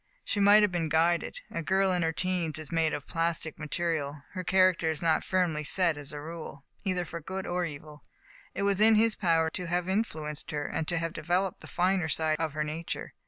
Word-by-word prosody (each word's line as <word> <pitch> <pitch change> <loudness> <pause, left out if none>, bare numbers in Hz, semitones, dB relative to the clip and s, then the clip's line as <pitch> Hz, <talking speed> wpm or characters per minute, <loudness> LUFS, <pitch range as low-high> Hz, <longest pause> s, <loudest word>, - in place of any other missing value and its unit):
She 205 - -1
might 205 +1 +7
have 205 - +3
been 165 -3 -1
guided. 165 +2 +1
A 165 - -3
girl 190 +3 +2
in 180 -1 +1
her 165 -1 +1
teens 175 -2 -1
is 155 +1 -7
made 165 -1 +2
of 145 -1 -4
plastic 165 -2 -2
material. 150 -2 -2
Her 185 -1 -5
character 185 -3 +3
is 160 +1 -3
not 165 -1 +2
firmly 175 -5 0
set 170 +1 +2
as 145 -1 -7
a 150 - -6
rule, 155 -3 -8 0.2
either 185 -3 0
for 170 +1 -7
good 190 +4 -5
or 175 0 -1
evil. 150 -1 -9 0.5
It 200 - -1
was 200 0 +2
in 220 +1 +7
his 225 0 +3
power 165 -3 +2
to 180 +1 -4
have 175 +1 0
in 195 +4 +2
fluenced 150 -7 -7
her, 145 -1 -2
and 160 +1 -3
to 175 - 0
have 165 0 -2
developed 175 +4 -1
the - - -12
finer 180 -1 +1
side 155 0 0
of 160 -2 -1
her 155 0 -1
nature. 155 +2 -5
165 Hz, 220 wpm, -29 LUFS, 155-185 Hz, 0.5 s, might